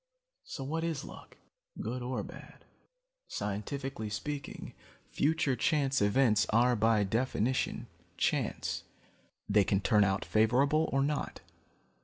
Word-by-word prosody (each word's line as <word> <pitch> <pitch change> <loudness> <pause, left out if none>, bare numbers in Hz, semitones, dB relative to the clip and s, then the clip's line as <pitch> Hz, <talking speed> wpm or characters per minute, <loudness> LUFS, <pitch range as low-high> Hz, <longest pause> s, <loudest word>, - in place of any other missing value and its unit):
"So 255 - -6
what 160 +4 -2
is 165 -3 -2
luck, - - -12 0.4
good 125 +1 -3
or 125 +1 -2
bad? - - -12 0.6
Scientifically 110 +3 -4
speaking, 140 +7 -5 0.4
future 150 -2 +1
chance 140 - +1
events 105 0 +3
are 120 +3 +4
by 110 -1 +3
definition 120 +3 0 0.3
chance. - - -1 0.6
They 105 0 +4
can 95 +1 +1
turn 105 +1 +4
out 95 0 0
favorable 135 +8 +3
or 135 0 +2
not. 145 +1 -2
125 Hz, 115 wpm, -31 LUFS, 105-140 Hz, 0.6 s, are